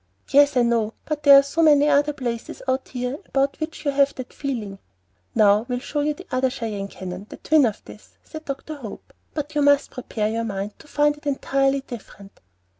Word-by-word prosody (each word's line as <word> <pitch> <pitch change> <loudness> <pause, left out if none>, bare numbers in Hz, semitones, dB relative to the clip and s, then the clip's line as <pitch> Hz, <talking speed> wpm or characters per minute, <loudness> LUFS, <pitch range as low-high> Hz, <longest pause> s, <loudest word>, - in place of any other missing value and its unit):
"Yes, 285 -1 +5
I 245 - +5
know; 230 -2 +1
but 305 -1 -3
there 280 -1 +9
are 275 - +7
so 305 +4 -1
many 295 -2 +6
other 290 0 +3
places 240 -4 -5
out 260 0 0
here 250 +3 -4
about 275 0 0
which 310 -1 -5
you 285 - +2
have 280 0 +2
that 255 -1 -8
feeling." 220 -9 -4 0.6
"Now 210 +1 +4
we 250 - 0
will - - -2
show 295 +3 -4
you 300 0 0
the 370 - -12
other 255 +1 +2
Cheyenne 215 -5 -4
Canyon, 185 +1 -8
the - - -9
twin 305 -5 +4
of 215 - -6
this," - - -15
said 315 -1 -10
Dr. 275 +3 -5
Hope; 225 -7 -10 0.2
"but 300 -1 -4
you 295 - +1
must 285 0 +4
prepare 225 -4 -3
your 225 +1 -1
mind 200 -1 -4
to - - -16
find 295 0 +2
it 295 0 -10
entirely 275 0 +1
different." 205 -6 -11
270 Hz, 210 wpm, -23 LUFS, 230-290 Hz, 0.6 s, there